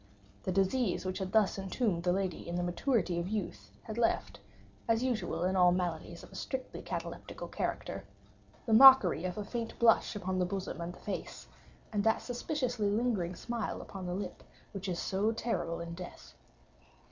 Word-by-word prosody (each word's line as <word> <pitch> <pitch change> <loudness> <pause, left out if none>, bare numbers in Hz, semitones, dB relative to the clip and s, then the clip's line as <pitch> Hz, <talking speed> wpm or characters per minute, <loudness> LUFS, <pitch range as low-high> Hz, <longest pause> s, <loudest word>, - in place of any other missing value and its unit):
The - - -2
disease 195 +2 +1
which 185 +1 -2
had 190 -1 -3
thus 210 -2 +3
entombed 195 -1 0
the 180 0 +2
lady 185 -3 -2
in 170 - -3
the 175 - 0
maturity 175 0 +1
of 170 - -2
youth, 170 - -4
had 220 +1 -5
left, 230 - +1 0.5
as 230 +1 +2
usual 190 -9 -1
in 185 +1 +1
all 180 -1 +6
maladies 180 -2 -2
of - - -13
a - - -12
strictly - - -5
cataleptical - - -6
character, - - -3 0.6
the 225 - +1
mockery 225 - +9
of 180 +1 -3
a 210 - -3
faint 230 +1 -4
blush 230 -2 +4
upon 185 -2 -2
the 180 - +3
bosom 190 -1 -4
and 170 +1 -4
the - - -14
face, 205 - -5 0.5
and 205 -1 +1
that 220 +1 +2
suspiciously 245 -3 -1
lingering 205 -5 0
smile 235 0 -3
upon 190 -2 -7
the 180 - -2
lip 200 - -5 0.3
which 195 -1 -5
is 175 - -1
so 200 +5 +1
terrible 225 -7 -2
in 170 0 -5
death. 180 +1 -9
195 Hz, 180 wpm, -32 LUFS, 180-225 Hz, 0.6 s, mockery